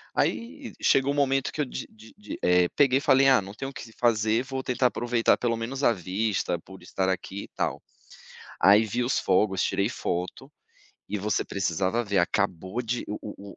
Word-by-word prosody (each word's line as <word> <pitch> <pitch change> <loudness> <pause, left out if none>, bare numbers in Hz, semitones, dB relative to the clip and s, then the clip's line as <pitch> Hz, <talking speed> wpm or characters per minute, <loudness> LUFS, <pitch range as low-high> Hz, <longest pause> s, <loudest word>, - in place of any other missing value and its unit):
Aí 250 +2 -2
chegou 135 +1 +3
um - - -5
momento 135 -2 +1
que 155 - -2
eu - - +1
di - - -6
di 110 0 -17
di 105 - -8
eh, 90 0 +4
peguei 135 -2 +4
e - - -9
falei: 135 0 +4
"Ah, 130 -5 +5
não 100 +1 -9
tem 135 +5 -6
o - - -6
que - - -8
se 115 - -13
fazer 110 -1 +2
vou 130 0 -5
tentar 125 0 +2
aproveitar 120 -1 +1
pelo 120 -1 0
menos 130 +5 -4
a 120 - +5
vista 95 0 -1
por 95 +3 -14
estar 95 - -2
aqui 95 +1 -4
e - - -11
tal.", - - -1 0.8
aí, 105 +3 +6
vi 120 +3 -1
os 130 - +1
fogos, 95 0 +2
tirei - - 0
foto 90 +1 -4 0.6
e 105 - -2
você 105 +2 -1
precisava 95 +4 -1
ver, 100 -3 -1
acabou 95 +3 -1
de 120 0 -3
o 105 - -4
o 100 -1 -9
110 Hz, 205 wpm, -26 LUFS, 95-130 Hz, 0.8 s, aí